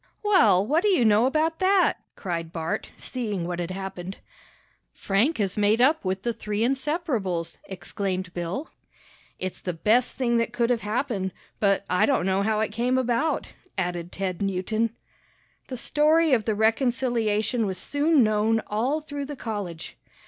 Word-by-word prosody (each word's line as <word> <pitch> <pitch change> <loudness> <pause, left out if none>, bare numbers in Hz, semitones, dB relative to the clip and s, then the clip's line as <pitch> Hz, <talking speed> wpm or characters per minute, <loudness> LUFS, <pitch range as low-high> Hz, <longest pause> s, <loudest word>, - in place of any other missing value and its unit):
"Well, 220 - +5
what 305 +8 +2
do 420 - +2
you 345 - +3
know 220 +3 +5
about 315 +3 0
that?" 380 0 +3 0.2
cried 165 -3 -4
Bart, 165 -1 -3
seeing 210 -9 -3
what 175 0 -3
had 175 0 -3
happened. 190 0 -6 0.8
"Frank 220 +11 +1
has 200 -1 -1
made 210 +2 +3
up 290 +6 +4
with 190 0 -2
the 235 - 0
three 210 -1 -3
inseparables!" 260 - -1
exclaimed 185 0 -4
Bill. 175 - -4 0.7
"It's 185 0 -5
the 180 - -3
best 220 +9 +2
thing 240 -2 +2
that 230 0 0
could 240 0 +1
have 235 -2 +1
happened, 210 -3 -2 0.3
but 200 -1 +2
I 180 - +3
don't 275 -10 +2
know 190 +1 +2
how 215 +1 +1
it 220 - -1
came 245 +4 +1
about," 255 +5 0 0.3
added 175 -2 -2
Ted 185 -2 -3
Newton. 205 +4 -1 0.7
The 255 - -5
story 305 +4 +3
of 225 -4 +2
the 220 - 0
reconciliation 225 -1 +1
was 190 -1 -3
soon 290 -1 +2
known 215 +1 +2
all 250 +9 0
through 290 -2 -5
the 290 +1 -6
college. 205 -10 -5
220 Hz, 160 wpm, -25 LUFS, 190-260 Hz, 0.8 s, Well